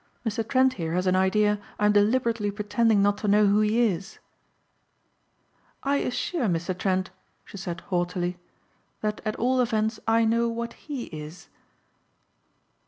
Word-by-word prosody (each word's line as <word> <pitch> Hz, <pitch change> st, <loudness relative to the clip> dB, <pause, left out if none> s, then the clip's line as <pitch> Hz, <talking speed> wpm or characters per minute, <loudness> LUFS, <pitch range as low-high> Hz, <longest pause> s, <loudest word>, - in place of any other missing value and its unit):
"Mr. 225 Hz, +1 st, -1 dB
Trent 260 Hz, -1 st, +3 dB
here 165 Hz, 0 st, -2 dB
has 180 Hz, +1 st, 0 dB
an 185 Hz, 0 st, +3 dB
idea 210 Hz, +2 st, +2 dB, 0.2 s
I'm 210 Hz, 0 st, +3 dB
deliberately 220 Hz, +1 st, +2 dB
pretending 210 Hz, +1 st, +1 dB
not 205 Hz, 0 st, +2 dB
to 210 Hz, -, -3 dB
know 210 Hz, +1 st, +5 dB
who 200 Hz, +1 st, +4 dB
he 215 Hz, +2 st, +2 dB
is." 195 Hz, -2 st, -3 dB, 1.7 s
"I 280 Hz, +1 st, +2 dB
assure 265 Hz, +1 st, -1 dB
Mr. 175 Hz, 0 st, -1 dB
Trent," 185 Hz, 0 st, -1 dB, 0.3 s
she -, -, -11 dB
said 180 Hz, -3 st, -5 dB
haughtily, 175 Hz, 0 st, -2 dB, 0.6 s
"that 210 Hz, 0 st, -2 dB
at 215 Hz, -, -1 dB
all 255 Hz, +2 st, +1 dB
events 220 Hz, -2 st, 0 dB
I 225 Hz, 0 st, +4 dB
know 230 Hz, +1 st, +2 dB
what 235 Hz, 0 st, -4 dB
he 280 Hz, -5 st, -6 dB
is." 155 Hz, +3 st, -9 dB
210 Hz, 145 wpm, -26 LUFS, 190-230 Hz, 1.7 s, know